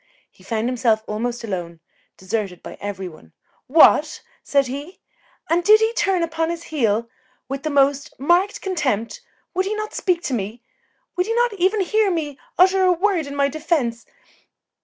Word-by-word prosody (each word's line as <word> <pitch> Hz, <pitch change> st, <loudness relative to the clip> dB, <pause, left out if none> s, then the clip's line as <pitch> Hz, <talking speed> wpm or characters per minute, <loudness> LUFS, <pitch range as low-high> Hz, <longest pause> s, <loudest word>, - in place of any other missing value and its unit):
He -, -, -22 dB
found 225 Hz, 0 st, -2 dB
himself 230 Hz, -3 st, +1 dB
almost 235 Hz, +3 st, -3 dB
alone, 175 Hz, -6 st, -5 dB, 0.4 s
deserted 190 Hz, -1 st, -4 dB
by -, -, -8 dB
every 195 Hz, -2 st, -4 dB
one. 155 Hz, -, -15 dB, 0.3 s
"What!" 305 Hz, +1 st, +5 dB, 0.2 s
said 280 Hz, -1 st, +2 dB
he, 285 Hz, +8 st, -7 dB, 0.5 s
"and 340 Hz, +2 st, +1 dB
did 430 Hz, +3 st, +7 dB
he 445 Hz, +1 st, +1 dB
turn 385 Hz, -6 st, +1 dB
upon 325 Hz, 0 st, -1 dB
his 340 Hz, 0 st, -4 dB
heel 230 Hz, -5 st, +1 dB, 0.4 s
with 275 Hz, +1 st, -4 dB
the 310 Hz, -, -2 dB
most 280 Hz, -1 st, +2 dB
marked 350 Hz, +8 st, +2 dB
contempt? 295 Hz, -, -2 dB, 0.3 s
Would 375 Hz, +1 st, 0 dB
he 425 Hz, -, -1 dB
not 430 Hz, 0 st, -5 dB
speak 350 Hz, -3 st, 0 dB
to 270 Hz, -, -2 dB
me? 225 Hz, +1 st, -4 dB, 0.5 s
Would 360 Hz, +2 st, +1 dB
he 455 Hz, -, -1 dB
not 480 Hz, -1 st, +2 dB
even 390 Hz, +2 st, +1 dB
hear 425 Hz, +2 st, +2 dB
me 300 Hz, -6 st, -3 dB, 0.2 s
utter 380 Hz, +1 st, +5 dB
a 365 Hz, -, +5 dB
word 355 Hz, -3 st, +1 dB
in 280 Hz, -, -6 dB
my 280 Hz, 0 st, +2 dB
defence?" 280 Hz, -6 st, -1 dB
290 Hz, 170 wpm, -21 LUFS, 230-365 Hz, 0.5 s, did